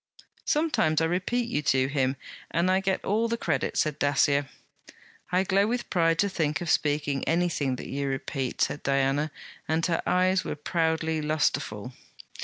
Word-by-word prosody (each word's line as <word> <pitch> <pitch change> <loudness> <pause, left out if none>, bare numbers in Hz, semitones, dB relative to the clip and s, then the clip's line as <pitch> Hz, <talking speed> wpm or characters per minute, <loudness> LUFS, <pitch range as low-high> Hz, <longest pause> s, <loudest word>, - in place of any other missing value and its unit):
'Sometimes 300 - +2
I 165 - +2
repeat 190 +8 -1
you 235 - -1
to 130 -2 +2
him, 135 -1 0 0.3
and 170 +3 +1
I 190 - +3
get 195 -1 -1
all 220 +4 +1
the 235 0 -1
credit,' 155 - -1
said 150 -1 0
Dacier. 145 -1 +2 0.8
'I 180 +1 +3
glow 195 +2 +2
with 240 +1 -3
pride 165 -2 +3
to 200 - +2
think 160 -6 -1
of 175 -2 -1
speaking 145 -2 0
anything 165 -6 0
that - - -8
you 140 0 -3
repeat,' 135 -1 -3
said 145 - 0
Diana, 140 +2 +1 0.4
and 160 +1 +1
her 170 -2 0
eyes 185 +1 +2
were - - -4
proudly 160 0 0
lustreful. 150 -6 -1
160 Hz, 165 wpm, -27 LUFS, 145-185 Hz, 0.8 s, I